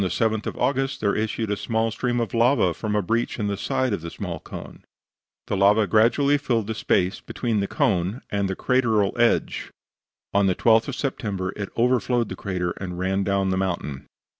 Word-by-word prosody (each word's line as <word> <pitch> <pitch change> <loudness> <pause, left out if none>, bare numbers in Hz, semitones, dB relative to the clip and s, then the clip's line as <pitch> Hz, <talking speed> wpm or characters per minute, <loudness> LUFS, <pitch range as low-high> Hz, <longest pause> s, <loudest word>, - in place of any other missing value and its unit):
On - - +1
the - - 0
7th 110 0 0
of - - -4
August 135 +2 0
there 100 -2 +1
issued 110 0 -1
a - - +1
small 110 +2 -1
stream 120 +2 -1
of 115 -5 -2
lava 115 -6 +3
from 105 +3 -3
a 105 - +1
breach 115 +6 -1
in 105 - -2
the 100 -1 -1
side 125 +4 -1
of 85 - -3
a 85 - -4
small 85 -3 -5
cone; - - -10 0.6
the - - -2
lava 100 +2 +4
gradually 120 +9 +3
filled 120 -7 0
the 110 - -3
space 95 -3 +1
between 115 -4 -2
the 100 - -1
cone 105 - 0
and 100 -1 0
the 95 - -2
crateral 110 -6 +1
edge; 120 -1 +1 0.6
on 100 -1 +3
the 95 - +2
12th 115 +2 +4
of 140 - -3
September 100 -9 -3
it 100 -2 -4
overflowed 120 -1 +2
the - - -5
crater, 90 -3 -2
and 90 -2 -5
ran 95 +2 0
down 100 0 +1
the 95 - 0
mountain. 85 -8 -3
105 Hz, 205 wpm, -24 LUFS, 95-120 Hz, 0.6 s, lava